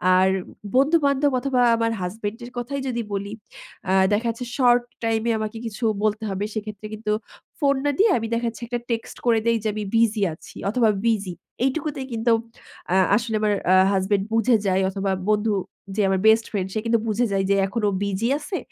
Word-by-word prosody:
আর 190 +1 +4 0.5
বন্ধু-বান্ধব 280 0 +3
অথবা 260 -1 0 0.2
আমার 230 0 0
হাসব্যান্ড 205 +4 -4
এর 245 - -10
কথাই 270 +3 -3
যদি 235 -2 -1
বলি 200 +1 -3 0.6
আ - - +2 0.2
দেখা 220 +3 +1
যাচ্ছে 230 +2 -4
শর্ট 245 -2 +5 0.2
টাইম 225 -1 +1
এ - - +3
আমাকে 215 +1 -4
কিছু 225 +2 -6 0.2
বলতে 215 +1 0
হবে 195 +1 -2
সেক্ষেত্রে 215 -1 -6
কিন্তু 215 0 -3 0.5
ফোন 280 -2 +3
না 290 - +3
দিয়ে 420 +1 +5
আমি 225 - -3
দেখাচ্ছি 230 -1 -3
একটা 240 0 -2
টেক্সট 230 -1 -3
করে 230 -2 +4
দেই 230 0 +3
যে 220 - 0
আমি 215 - -3
বিজি 225 -2 +3
আছি 155 - -14
অথবা 225 +1 +3 0.2
বিজি, 205 -5 0 0.3
এইটুকুতেই 275 0 -2
কিন্তু 230 +1 +1 0.6
আ - - +3 0.2
আসলে 230 0 -1
আমার 210 -1 +2 0.2
আ - - +6 0.2
হাসব্যান্ড 195 +1 +1
বুঝে 225 +2 +4
যায় 190 0 +2
অথবা 195 0 -2 0.2
বন্ধু 215 +1 +2 0.4
যে 215 - +1
আমার 190 0 +1
বেস্ট 220 +1 +5
ফ্রেন্ড 195 -3 -1
সে 215 - 0
কিন্তু 230 0 +2
বুঝে 220 +3 +1
যায় 195 -1 +1
যে 200 - +4
এখন 220 +4 -3
ও - - -2
বিজি 200 +3 -1
আছে, 305 +5 -4
225 Hz, 190 wpm, -23 LUFS, 205-245 Hz, 0.6 s, আ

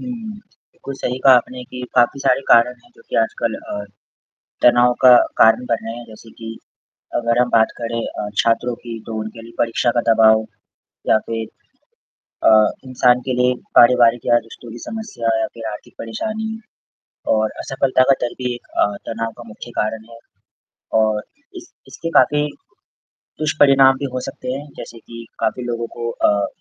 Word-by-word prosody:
हुँ, 250 - -6 0.6
बिल्कुल 140 -5 -8
सही 125 -1 -3
कहा 135 -1 +8
आपने 125 +1 -3
कि 125 - -7
काफ़ी 120 +3 +3
सारे 135 -1 +2
कारण 120 +1 +5
हैं - - -24
जो - - -18
कि - - -3
आजकल 115 0 -2
अ, 105 0 -6 0.8
तनाव 120 0 +5
का 125 -1 +9 0.2
कारण 115 +3 +5
बन 115 -2 -2
रहे 115 - -5
हैं। 120 - -9
जैसे 110 0 -14
कि 115 0 -8 0.6
अगर 115 0 0
हम 125 0 +1
बात 110 -1 +4
करें 115 -1 -3
अ, 105 - -5
छात्रों 115 +1 0
की 115 -1 -6
तो 115 - -6
उनके 110 +1 -8
लिए 115 +1 -13
परीक्षा 115 +1 +1
का - - +4
दबाव 110 0 +5 0.6
या - - +5
फ़िर 115 -1 -3 1.0
अ, 110 -1 +5 0.2
इंसान 125 -1 +3
के 130 - 0
लिए 125 0 +3 0.2
पारिवारिक 120 -1 +5
या 120 - +4
रिश्तों 115 0 -12
की 120 - -9
समस्या। 205 - -2
या - - 0
फ़िर 115 -1 -9
आर्थिक 105 - -11
परेशानी 220 - -4 0.8
और 110 0 0
असफलता 135 -1 +1
का - - +7
दर्द 120 - -3
भी 125 0 -1
एक - - -15
अ, - - +4 0.2
तनाव 115 0 -3
का 120 - -10
मुख्य 110 +2 -11
कारण 110 +1 -4
है 115 - -12 0.8
और 110 -1 0 0.3
इस 345 -1 -12 0.2
इसके 165 - -6
काफ़ी 150 0 +2 0.9
दुष्परिणाम 140 -3 +4
भी 140 - -3
हो 130 - -2
सकते 125 - -6
हैं 140 +2 -6
जैसे 115 - -9
कि 115 +1 -11
काफ़ी 125 - -1
लोगों 120 -1 -3
को 115 0 -3
अ, 100 -3 +1
120 Hz, 175 wpm, -19 LUFS, 115-125 Hz, 1.0 s, का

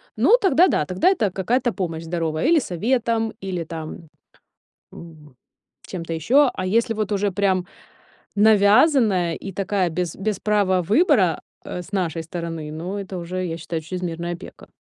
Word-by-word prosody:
ну 475 - +5
тогда 365 - +5
да, 150 - +1
тогда 185 - +2
это 230 - +1
какая-то 235 +7 0
помощь 165 -4 -4
здоровая. 165 -2 -2
Или 330 -1 +5
советом, 225 - -1
или 185 -3 -3
там, 160 0 -8 0.8
м, 155 -5 -13 0.5
чем-то 165 -3 -5
ещё. 250 - +4
А 185 - -4
если 230 +5 +1
вот 215 -1 -3
уже 205 0 0
прям 190 -2 +1 0.7
навязанная 210 - +4
и 195 - -7
такая 190 -1 -1
без 170 0 -3
без 200 0 -2
права 200 -3 +2
выбора, 205 - +3 0.3
э, 180 - -5
с 180 - -14
нашей 170 -4 -1
стороны, 165 -2 -6
ну 175 +6 -5
это 195 -2 -6
уже, 180 +2 -4
я 165 -2 -4
считаю, 165 0 -4
чрезмерная 170 0 -4
опека. 170 - -11
185 Hz, 155 wpm, -22 LUFS, 170-215 Hz, 0.8 s, ну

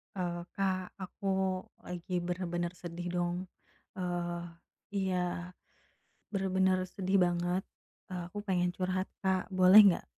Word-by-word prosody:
Eee, 175 -1 -3
Kak 190 -2 -1
aku 185 - -9 0.6
lagi 180 +1 -6
bener-bener 175 -1 -1
sedih 175 0 -5
dong. 175 0 +1 0.6
Eee, 175 -1 -2 0.6
iya 190 -2 +1 1.2
bener-bener 190 -1 +2 0.2
sedih 190 0 +1
banget, 175 +1 0 0.5
eee, 180 -1 -3
aku 205 - -6
pengen 180 -2 +2
curhat, 185 0 0 0.2
Kak, 190 -1 +1
boleh 185 +3 +10
nggak? 180 - +3
180 Hz, 110 wpm, -32 LUFS, 175-190 Hz, 1.2 s, boleh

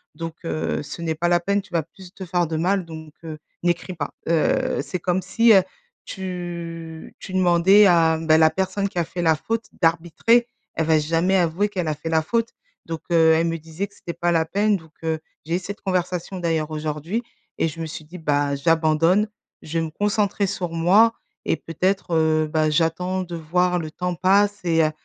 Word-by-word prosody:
donc, 165 +1 -5
heu, 155 - -2
ce 145 +4 -8
n'est 165 -1 -1
pas 170 +2 0
la 175 0 +3
peine, 200 +3 0
tu 190 - -21
vas 165 -2 +1
plus 180 +3 -15
te 195 - -8
faire 175 -1 0
de 160 - -3
mal 185 +3 +1
donc, 160 -2 -10
heu, 155 -1 -6 0.3
n'écris 175 +1 -1
pas». 160 -4 -4 0.2
Heu, 255 - +1
c'est 180 - -5
comme 180 +2 0
si, 230 +5 +4
heu, 195 - +7 0.4
tu 170 -3 -6
tu 185 - -9
demandais 185 +3 +5
à, 165 -2 +4
bah, 160 -1 +4
la 160 0 +6
personne 190 +3 -1
qui 180 - -3
a - - +2
fait 175 - -5
la 160 -1 +4
faute 225 +8 -3 0.2
d'arbitrer, 175 +9 +2 0.3
elle 160 - 0
va 160 -1 +4
jamais 165 +5 +1
avouer 175 +4 +1
qu'elle 180 -5 -3
a 155 - -1
fait 155 +2 -6
la 160 0 +3
faute. 230 +6 0 0.4
Donc, 165 -1 -5
heu, 160 -1 +5
elle 165 +1 +2
me 165 0 -1
disait 165 +5 -5
que 200 - -25
c'était 170 - -7
pas 175 +1 0
la 165 -1 +2
peine 205 +4 +1
donc, 160 -3 -17
heu, 160 -1 0 0.3
j'ai 165 +2 -1
eu - - -3
cette 200 +3 -8
conversation 180 0 -2
d'ailleurs 165 -3 -1
aujourd'hui 155 +8 -3 0.3
et - - +1
je 160 +2 -10
me 160 - -3
suis 155 0 -8
dit: 175 +4 -10
«Bah 145 -2 0
j'abandonne, 165 +6 +2 0.4
je 165 +2 -2
vais 165 - -1
me - - -5
concentrer 205 +2 0
sur 185 -2 -3
moi 190 +8 +4 0.3
et - - +1
peut-être, 185 +2 -2
heu, 155 -1 +2
bah, 155 -1 +2
j'attends 180 +4 0
de 175 -1 -7
voir 180 +2 +1
le 160 -2 -5
temps 180 +2 -3
passe 200 +3 +3
et 165 -1 +3
heu 155 - 0
170 Hz, 210 wpm, -22 LUFS, 160-190 Hz, 0.4 s, heu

